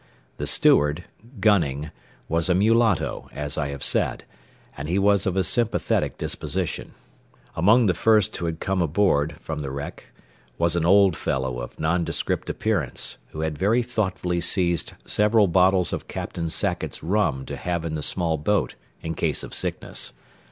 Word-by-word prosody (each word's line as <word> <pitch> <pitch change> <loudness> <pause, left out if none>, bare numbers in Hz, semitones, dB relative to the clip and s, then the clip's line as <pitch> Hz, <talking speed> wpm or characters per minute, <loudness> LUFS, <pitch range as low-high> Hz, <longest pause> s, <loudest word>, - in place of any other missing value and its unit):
The - - -3
steward, 75 +4 +3 0.4
Gunning, 75 -9 +2 0.4
was 85 +2 +1
a 90 - +4
mulatto, 110 -1 +2
as 75 0 -3
I 75 -2 -1
have 70 -1 -6
said, - - +2 0.5
and 75 +2 -6
he 90 - +1
was 100 0 +3
of 95 - 0
a 95 - +3
sympathetic 115 +6 0
disposition. - - -3 0.6
Among 110 +8 +4
the 95 - +3
men - - -11
who 110 -5 +3
had 80 -1 -3
first - - -31
come 95 -1 -1
aboard 80 -3 +1
from 80 -2 -5
the 70 -2 -4
wreck 70 +1 -7 0.5
was 85 0 +1
an 85 -1 +1
old 100 -2 +5
fellow 65 -3 -2
of - - -8
nondescript 85 +2 -1
appearance 95 - -1
who 80 - -7
had 80 -2 -3
very 110 +6 +2
thoughtfully 95 -7 -2
seized 85 -1 0
several 105 0 +3
bottles 95 0 +3
of - - -4
Captain 85 -1 -4
Sackett's 80 -1 -2
rum 85 -7 0
to - - -6
have 85 -2 -3
in 80 - -3
the 75 - -3
small 80 0 0
boat 105 +7 0 0.3
in 80 - -3
case - - -1
of - - -8
sickness. - - -2
85 Hz, 165 wpm, -24 LUFS, 80-100 Hz, 0.6 s, old